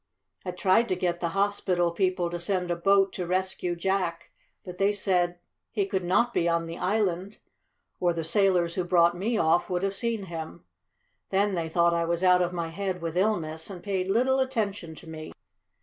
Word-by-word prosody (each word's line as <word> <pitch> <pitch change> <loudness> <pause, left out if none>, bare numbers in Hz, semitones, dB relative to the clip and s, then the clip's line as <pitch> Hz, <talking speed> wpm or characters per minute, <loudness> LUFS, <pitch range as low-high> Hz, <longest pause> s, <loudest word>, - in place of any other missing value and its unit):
"I 185 - -5
tried 190 +6 +2
to 185 - +1
get 175 -1 -1
the 170 - -1
hospital 190 -3 +1
people 180 -1 0
to 175 - -3
send 180 0 -1
a - - +1
boat 195 +2 +3
to 180 -2 -4
rescue 185 -1 -1
Jack; 180 -1 -2 0.3
but 180 -1 -9
they 200 +1 +3
said 180 -3 +1 0.3
he 205 -4 0
could 190 -1 -2
not 235 +7 +2
be 170 - +1
on 170 0 +1
the 165 +1 -7
island, 195 0 -1 0.6
or 175 -1 +2
the 165 -1 -3
sailors 180 -1 +2
who 185 - -1
brought 175 -1 +3
me 215 +6 -1
off 165 +2 +2
would 180 0 -1
have 195 0 0
seen 230 -1 -2
him. 170 -1 -7 0.7
Then 200 +1 +1
they 165 -3 -2
thought 170 +1 +3
I 170 0 +1
was 170 +2 -1
out 180 -1 +5
of 175 0 0
my 170 -2 -3
head 190 +1 -3
with 165 -1 -4
illness, 170 -5 0
and 180 -3 -9
paid 190 -2 -1
little 255 +6 +2
attention 205 -10 -2
to 165 - -13
me. 155 -1 -8
180 Hz, 195 wpm, -27 LUFS, 170-195 Hz, 0.7 s, out